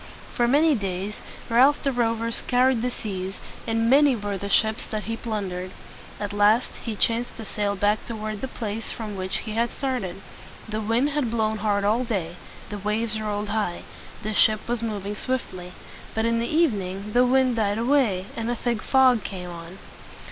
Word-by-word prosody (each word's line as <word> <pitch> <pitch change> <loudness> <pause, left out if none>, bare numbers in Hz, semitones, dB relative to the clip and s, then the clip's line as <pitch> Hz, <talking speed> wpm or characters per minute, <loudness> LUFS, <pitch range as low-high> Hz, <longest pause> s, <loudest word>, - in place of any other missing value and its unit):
For 240 - +2
many 300 +5 +4
days, 195 -2 -3 0.3
Ralph 260 +5 +4
the 275 - +2
Rover 230 -2 0
scoured 250 0 +2
the 250 - 0
seas, 195 -5 -5 0.3
and 225 0 +1
many 280 +1 +6
were 205 -2 -3
the 200 +1 -5
ships 220 +1 +3
that 215 -1 -3
he 225 - -3
plun 215 -5 -3
dered. 180 +1 -4 0.5
At 205 -1 -3
last 210 +4 +3
he 225 -3 -5
chanced 230 +3 +1
to 225 - -7
sail 205 -1 -1
back 205 +2 +1
toward 215 -2 -4
the 265 - -2
place 225 -3 -5
from 215 -3 -5
which 185 0 -1
he 220 - -4
had 230 +2 +1
started. 230 -9 -3 0.4
The 215 0 -3
wind 230 +7 +1
had 280 -4 0
blown 220 -1 0
hard 205 -1 +1
all 220 +5 +2
day. 190 -8 -2 0.4
The 205 - -4
waves 215 +2 -1
rolled 210 -1 -2
high. 205 -5 -1 0.4
The 215 +1 -2
ship 215 +1 +4
was 240 -1 -1
moving 210 -2 -3
swiftly. 185 -8 -3 0.4
But 220 0 +1
in 230 0 +2
the 235 - -1
evening 210 - 0
the 245 - +5
wind 255 -1 +3
died 205 -2 +1
away, 230 -7 +2
and 230 0 -2
a 240 - 0
thick 235 -2 -1
fog 260 -4 +4
came 180 -3 -6
on. 170 +2 -9
220 Hz, 185 wpm, -25 LUFS, 205-240 Hz, 0.5 s, many